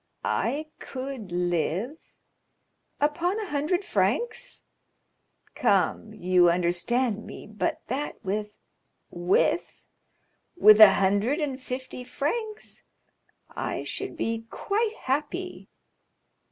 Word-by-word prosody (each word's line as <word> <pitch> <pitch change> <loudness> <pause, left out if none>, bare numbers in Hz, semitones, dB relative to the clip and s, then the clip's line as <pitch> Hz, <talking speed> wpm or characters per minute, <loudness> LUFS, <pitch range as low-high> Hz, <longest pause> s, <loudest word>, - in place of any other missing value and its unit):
"I 300 +3 0
could 260 -7 -6
live——" 175 - 0 1.0
"Upon 340 +7 +1
a 430 - -3
hundred 350 +4 -1
francs!" 475 +2 -1 0.9
"Come—you 185 -5 +2
understand 195 +7 +1
me; - - -9
but 215 0 -3
that 275 +4 -3
with——" 210 +2 -2 0.6
"With?" 175 +1 +1 0.7
"With 215 -9 +8
a 205 -3 +11
hundred 205 - +2
and 275 -4 -2
fifty 255 0 -6
francs 425 - -3 0.7
I - - -3
should - - -5
be 225 0 -2
quite 435 +2 -1
happy." 300 +7 -2
255 Hz, 90 wpm, -27 LUFS, 200-300 Hz, 1.0 s, a